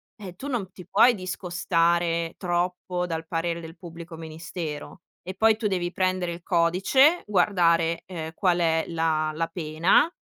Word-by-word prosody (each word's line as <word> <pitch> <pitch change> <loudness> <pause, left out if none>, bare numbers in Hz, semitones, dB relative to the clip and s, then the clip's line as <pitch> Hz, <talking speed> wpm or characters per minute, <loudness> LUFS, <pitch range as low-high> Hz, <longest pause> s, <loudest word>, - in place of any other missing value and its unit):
ehm, 195 -5 -9
tu 270 - -7
non 225 -9 -3
ti 180 -1 -13
puoi 235 +4 +5
discostare 170 -3 0
troppo 180 0 -1
dal 165 -2 -4
parere 165 0 -2
del 165 +1 -10
Pubblico 170 -1 -10
Ministero, 160 0 -7 0.2
e 185 +1 -7
poi 220 +2 +4
tu 220 -1 -1
devi 180 -3 -1
prendere 185 -1 0
il 170 +1 -7
codice, 190 - +3
guardare, 170 -4 +2
ehm, 160 -3 -6
qual 180 0 +1
è 165 -2 +1
la 160 -2 0
la 165 +1 0
pena 165 - +2
175 Hz, 150 wpm, -25 LUFS, 165-185 Hz, 0.2 s, puoi